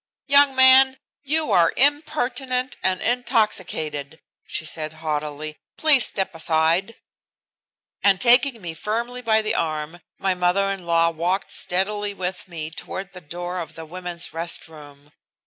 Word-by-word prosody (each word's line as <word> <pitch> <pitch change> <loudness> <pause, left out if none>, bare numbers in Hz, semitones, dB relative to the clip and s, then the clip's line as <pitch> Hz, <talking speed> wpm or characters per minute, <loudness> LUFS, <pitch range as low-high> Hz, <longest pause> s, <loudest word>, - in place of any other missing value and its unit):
"Young 280 -1 +5
man, 260 0 +6 0.2
you 300 -2 -1
are 170 -4 +4
impertinent 265 -3 0
and 185 -1 0
intoxicated," 190 - -1 0.3
she 160 - -3
said 155 0 -3
haughtily. 155 -1 -4 0.2
"Please 295 -6 +6
step 190 -1 -3
aside." 165 +6 +1 1.1
And 195 -2 +4
taking 245 -2 +4
me 170 -2 -5
firmly 235 +8 -3
by 220 -2 +2
the 215 - 0
arm 155 +1 -3 0.2
my 190 -1 0
mother 180 +2 +1
in 190 -3 -7
law 165 0 +3
walked 175 +4 -2
steadily 205 +3 -1
with 185 0 -4
me 160 -3 -6
toward 190 +3 -7
the 180 - -10
door 175 +3 -6
of 165 -3 -7
the 160 - -8
women's 175 +1 -6
rest 165 +2 -2
room. 145 -2 -15
185 Hz, 140 wpm, -22 LUFS, 160-240 Hz, 1.1 s, man